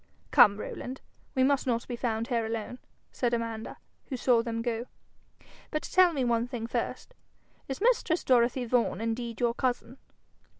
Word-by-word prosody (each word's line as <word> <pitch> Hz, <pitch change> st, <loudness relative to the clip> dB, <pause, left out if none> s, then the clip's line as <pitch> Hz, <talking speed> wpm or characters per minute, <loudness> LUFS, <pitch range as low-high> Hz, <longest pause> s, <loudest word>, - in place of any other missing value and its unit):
'Come, 200 Hz, -1 st, +7 dB
Rowland, 255 Hz, +4 st, -6 dB, 0.4 s
we 260 Hz, -, +3 dB
must 275 Hz, 0 st, +2 dB
not 235 Hz, -1 st, 0 dB
be 245 Hz, -, -3 dB
found 230 Hz, 0 st, -2 dB
here 235 Hz, -2 st, +1 dB
alone,' 225 Hz, +2 st, -4 dB, 0.3 s
said 240 Hz, -1 st, 0 dB
Amanda, 230 Hz, -1 st, -4 dB, 0.3 s
who 260 Hz, -, -4 dB
saw 240 Hz, -1 st, +3 dB
them 230 Hz, -1 st, -3 dB
go. 235 Hz, 0 st, -2 dB, 0.8 s
'But 305 Hz, -, -2 dB
tell 365 Hz, -1 st, +4 dB
me 280 Hz, -5 st, -1 dB
one 235 Hz, 0 st, +1 dB
thing 245 Hz, -3 st, -4 dB
first: 235 Hz, -, -3 dB, 0.5 s
is 270 Hz, -, -4 dB
mistress 440 Hz, -7 st, +2 dB
Dorothy 245 Hz, 0 st, +3 dB
Vaughan 235 Hz, -2 st, +1 dB
indeed 230 Hz, 0 st, -3 dB
your 235 Hz, -1 st, +2 dB
cousin?' 255 Hz, +1 st, -2 dB
240 Hz, 160 wpm, -29 LUFS, 230-260 Hz, 0.8 s, Come